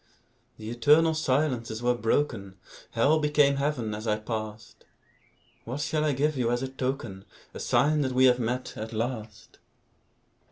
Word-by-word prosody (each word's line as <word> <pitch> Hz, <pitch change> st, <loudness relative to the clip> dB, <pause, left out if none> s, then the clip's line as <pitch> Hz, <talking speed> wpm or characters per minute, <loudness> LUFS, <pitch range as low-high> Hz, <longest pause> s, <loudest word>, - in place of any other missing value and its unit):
The 110 Hz, +1 st, -7 dB
eternal 150 Hz, +7 st, +4 dB
silences 130 Hz, -6 st, -1 dB
were 125 Hz, 0 st, +3 dB
broken; 115 Hz, -5 st, -1 dB, 0.4 s
Hell 145 Hz, +7 st, +3 dB
became 150 Hz, -2 st, +3 dB
Heaven 135 Hz, -6 st, -1 dB
as 110 Hz, +2 st, -6 dB
I 105 Hz, 0 st, +2 dB
passed. 110 Hz, 0 st, -6 dB, 0.8 s
What 125 Hz, +5 st, -5 dB
shall 155 Hz, 0 st, 0 dB
I 155 Hz, -, +2 dB
give 150 Hz, +3 st, 0 dB
you 120 Hz, -2 st, +1 dB
as 120 Hz, +1 st, 0 dB
a -, -, -1 dB
token, 130 Hz, -7 st, -4 dB, 0.3 s
A -, -, -8 dB
sign 150 Hz, +1 st, +2 dB
that 130 Hz, -2 st, -1 dB
we 130 Hz, +1 st, +5 dB
have 125 Hz, -1 st, +5 dB
met, 125 Hz, +2 st, -3 dB
at 110 Hz, +1 st, -6 dB
last? 110 Hz, -2 st, -5 dB
125 Hz, 155 wpm, -27 LUFS, 110-145 Hz, 0.8 s, we